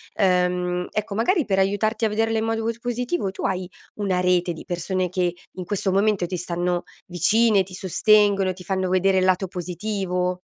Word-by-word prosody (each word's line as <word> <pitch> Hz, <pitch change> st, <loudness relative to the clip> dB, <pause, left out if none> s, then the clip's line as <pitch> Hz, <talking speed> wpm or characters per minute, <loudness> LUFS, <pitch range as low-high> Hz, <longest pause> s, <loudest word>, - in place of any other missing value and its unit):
ehm, 180 Hz, -1 st, +1 dB
ecco, 210 Hz, -1 st, -3 dB
magari 270 Hz, -, +1 dB
per 195 Hz, -2 st, +1 dB
aiutarti 215 Hz, +3 st, +1 dB
a 220 Hz, -, +2 dB
vederle 225 Hz, +1 st, 0 dB
in -, -, -1 dB
modo 225 Hz, 0 st, -1 dB
cos 230 Hz, +1 st, -2 dB
positivo, 245 Hz, -, -2 dB
tu 190 Hz, -, -7 dB
hai 185 Hz, -1 st, -2 dB, 0.3 s
una 190 Hz, -3 st, 0 dB
rete 180 Hz, -1 st, +2 dB
di 160 Hz, -, -11 dB
persone 180 Hz, +1 st, -2 dB
che 180 Hz, -1 st, -1 dB, 0.2 s
in 185 Hz, -, -4 dB
questo 195 Hz, 0 st, -1 dB
momento 195 Hz, -1 st, +2 dB
ti 180 Hz, +1 st, -4 dB
stanno 175 Hz, 0 st, -2 dB, 0.2 s
vicine, 210 Hz, +4 st, +3 dB
ti 185 Hz, 0 st, -11 dB
sostengono, 200 Hz, 0 st, +3 dB
ti 180 Hz, 0 st, -12 dB
fanno 190 Hz, 0 st, -1 dB
vedere 190 Hz, +1 st, +3 dB
il 185 Hz, -, +2 dB
lato 185 Hz, +1 st, +2 dB
positivo? 180 Hz, 0 st, -3 dB
190 Hz, 180 wpm, -23 LUFS, 180-215 Hz, 0.3 s, vicine